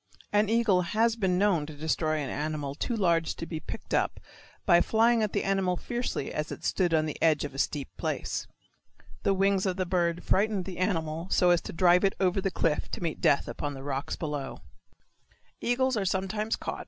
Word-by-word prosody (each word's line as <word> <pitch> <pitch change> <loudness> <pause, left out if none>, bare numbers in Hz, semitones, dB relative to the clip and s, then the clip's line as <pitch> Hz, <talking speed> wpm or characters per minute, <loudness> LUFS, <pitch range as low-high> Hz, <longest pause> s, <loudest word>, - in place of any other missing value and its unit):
An 210 0 +3
eagle 225 -5 +3
has 220 +6 +1
been 190 -5 +1
known 180 -7 +2
to 155 - -9
destroy 155 +1 0
an 140 -3 -3
animal 150 -1 -3
too 235 - -2
large 170 -6 +1
to - - -6
be 160 -2 -5
picked - - -8
up - - +1 0.5
by 175 0 +6
flying 225 +3 +3
at 210 -2 0
the - - -1
animal 190 -2 +1
fiercely 240 - -3
as 150 0 -3
it - - -7
stood 180 -3 +1
upon 155 -1 +3
the 155 - -5
edge 155 -3 +3
of 145 - -7
a 135 - -6
steep 145 -1 -1
place. - - -3 0.7
The 195 - +2
wings 195 0 +2
of 185 - 0
the 185 - 0
bird 175 -1 0
frightened 200 -1 +1
the 185 -2 -7
animal 165 -3 -1
so 180 -2 +4
as 175 - +3
to - - -7
drive 180 +2 +4
it 195 - +2
over 190 0 +2
the 195 - 0
cliff 165 -4 -1
to - - -3
meet 165 -2 -3
death 140 - +3
upon 145 -1 -4
the 135 - -8
rocks 135 -1 -3
below. 150 -4 -5 1.0
(Continued 245 +2 0
on 260 0 +3
page 200 -5 +1
36.) - - +1
NUTS. 210 +3 -1
1. - - -3
180 Hz, 215 wpm, -28 LUFS, 155-200 Hz, 1.0 s, by